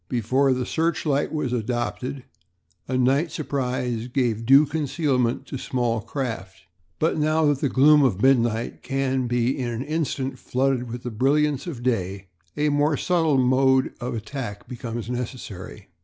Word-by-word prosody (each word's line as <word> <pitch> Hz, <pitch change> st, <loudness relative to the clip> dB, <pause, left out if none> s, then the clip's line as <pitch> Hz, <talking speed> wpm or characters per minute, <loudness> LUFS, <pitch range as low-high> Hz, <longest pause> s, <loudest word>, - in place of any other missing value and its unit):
Before 130 Hz, +3 st, +2 dB
the 125 Hz, -1 st, 0 dB
searchlight 160 Hz, -3 st, 0 dB
was 145 Hz, -5 st, -2 dB
adopted 125 Hz, +3 st, -3 dB, 0.6 s
a 130 Hz, -, -1 dB
night 135 Hz, +6 st, +2 dB
surprise 125 Hz, -5 st, -2 dB
gave 120 Hz, -4 st, -1 dB
due 135 Hz, +3 st, +7 dB
concealment 140 Hz, -5 st, 0 dB
to 135 Hz, -, -6 dB
small 120 Hz, -3 st, -1 dB
craft; 105 Hz, -7 st, -5 dB, 0.4 s
but 160 Hz, 0 st, +1 dB
now 155 Hz, +1 st, +2 dB
that 145 Hz, -2 st, +2 dB
the 140 Hz, -, 0 dB
gloom 150 Hz, +3 st, +6 dB
of 120 Hz, -9 st, +2 dB
midnight 120 Hz, -2 st, +2 dB
can 135 Hz, -2 st, -1 dB
be 120 Hz, +2 st, +1 dB
in 130 Hz, -3 st, -3 dB
an 120 Hz, +2 st, -3 dB
instant 135 Hz, -4 st, -2 dB
flooded 130 Hz, -1 st, 0 dB
with 120 Hz, 0 st, -6 dB
the 125 Hz, -, -4 dB
brilliance 140 Hz, +6 st, +1 dB
of 130 Hz, -8 st, -6 dB
day 95 Hz, -5 st, -2 dB, 0.3 s
a 150 Hz, 0 st, +2 dB
more 145 Hz, +1 st, +2 dB
subtle 165 Hz, -5 st, +2 dB
mode 130 Hz, +1 st, +3 dB
of 120 Hz, 0 st, -3 dB
attack 110 Hz, -2 st, -6 dB
becomes 120 Hz, -3 st, -5 dB
necessary. 115 Hz, -6 st, -6 dB
130 Hz, 150 wpm, -24 LUFS, 120-145 Hz, 0.6 s, due